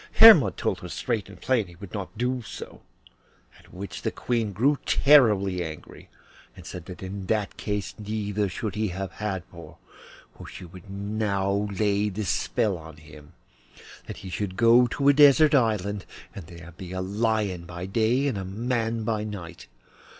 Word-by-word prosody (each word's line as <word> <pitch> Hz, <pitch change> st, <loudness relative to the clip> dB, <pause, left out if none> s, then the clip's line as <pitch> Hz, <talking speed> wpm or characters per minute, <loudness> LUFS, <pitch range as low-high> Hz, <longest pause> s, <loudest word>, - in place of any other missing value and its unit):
Hermod 160 Hz, -, +8 dB
told -, -, -1 dB
her -, -, -8 dB
straight 110 Hz, -5 st, -3 dB
and 95 Hz, -3 st, -13 dB
plain 115 Hz, 0 st, +1 dB
that -, -, -15 dB
he 85 Hz, -, -14 dB
would 90 Hz, 0 st, -11 dB
not 100 Hz, +1 st, -6 dB
do 125 Hz, +2 st, -1 dB
so, 110 Hz, -, -9 dB, 0.8 s
at -, -, -20 dB
which 100 Hz, +2 st, -7 dB
the -, -, -1 dB
Queen 115 Hz, -4 st, -2 dB
grew 130 Hz, +9 st, +2 dB
terribly 105 Hz, -10 st, +4 dB
angry, 80 Hz, -2 st, -10 dB, 0.5 s
and -, -, -13 dB
said 90 Hz, -2 st, -8 dB
that 90 Hz, 0 st, -9 dB
in 95 Hz, 0 st, -6 dB
that 105 Hz, -1 st, -1 dB
case 105 Hz, -2 st, -3 dB
neither 105 Hz, -1 st, -2 dB
should 105 Hz, +3 st, -4 dB
he 110 Hz, 0 st, -1 dB
have 95 Hz, +1 st, -5 dB
Hadvor, 95 Hz, -5 st, -6 dB, 0.6 s
for -, -, -11 dB
she -, -, -10 dB
would 90 Hz, +3 st, -13 dB
now 100 Hz, 0 st, -1 dB
lay 105 Hz, +1 st, +1 dB
this 105 Hz, +1 st, -4 dB
spell 105 Hz, -7 st, 0 dB
on 80 Hz, -1 st, -12 dB
him, 75 Hz, 0 st, -15 dB, 0.7 s
that -, -, -7 dB
he 95 Hz, -, -7 dB
should 95 Hz, -1 st, -4 dB
go 120 Hz, +2 st, +6 dB
to 140 Hz, +4 st, -1 dB
a 140 Hz, -, +8 dB
desert 145 Hz, +1 st, +6 dB
island 105 Hz, -6 st, +1 dB, 0.3 s
and 90 Hz, -6 st, -9 dB
there 85 Hz, 0 st, -11 dB
be 90 Hz, +2 st, -9 dB
a 95 Hz, -, -3 dB
lion 100 Hz, -2 st, -1 dB
by 90 Hz, 0 st, -7 dB
day 115 Hz, +7 st, +1 dB
and 130 Hz, -8 st, -1 dB
a -, -, -4 dB
man 115 Hz, +3 st, -2 dB
by 110 Hz, -1 st, -1 dB
night. 90 Hz, -6 st, -8 dB
100 Hz, 175 wpm, -26 LUFS, 95-115 Hz, 0.8 s, Hermod